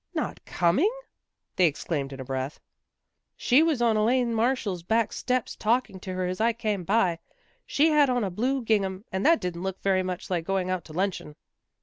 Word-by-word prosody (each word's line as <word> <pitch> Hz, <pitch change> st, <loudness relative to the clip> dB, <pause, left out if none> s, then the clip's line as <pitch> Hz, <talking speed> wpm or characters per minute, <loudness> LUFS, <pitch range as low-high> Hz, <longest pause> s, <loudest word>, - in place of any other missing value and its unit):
" -, -, -53 dB
Not -, -, -3 dB
com 175 Hz, +4 st, +1 dB
ing! 405 Hz, +8 st, +3 dB, 0.3 s
" -, -, -57 dB
they 180 Hz, -, +5 dB
exclaimed 145 Hz, -2 st, -3 dB
in 135 Hz, -, -8 dB
a -, -, -4 dB
breath. 130 Hz, +2 st, -4 dB, 0.4 s
" -, -, -56 dB
She 260 Hz, +4 st, +6 dB
was 315 Hz, -7 st, +2 dB
on 225 Hz, -2 st, +3 dB
Elaine 235 Hz, +2 st, +2 dB
Marshall's 225 Hz, -5 st, 0 dB
back 220 Hz, +5 st, 0 dB
steps 255 Hz, -1 st, -1 dB
talking 225 Hz, -3 st, 0 dB
to 185 Hz, 0 st, -6 dB
her 185 Hz, 0 st, -1 dB
as 185 Hz, +3 st, -3 dB
I 230 Hz, +1 st, +3 dB
came 215 Hz, -5 st, -2 dB
by. 190 Hz, -3 st, +1 dB, 0.5 s
She 310 Hz, +3 st, +3 dB
had 295 Hz, -2 st, +4 dB
on 245 Hz, -2 st, +1 dB
a 195 Hz, -, -2 dB
blue 255 Hz, +7 st, -1 dB
gingham, 200 Hz, -2 st, 0 dB
and 190 Hz, +1 st, -2 dB
that 330 Hz, 0 st, +5 dB
didn't 175 Hz, -1 st, -4 dB
look 190 Hz, 0 st, -4 dB
very 190 Hz, -1 st, +2 dB
much 185 Hz, 0 st, -5 dB
like 175 Hz, -2 st, 0 dB
going 185 Hz, 0 st, -1 dB
out 185 Hz, -3 st, -2 dB
to 155 Hz, -, -11 dB
luncheon." 180 Hz, -4 st, -2 dB
195 Hz, 215 wpm, -26 LUFS, 180-235 Hz, 0.5 s, She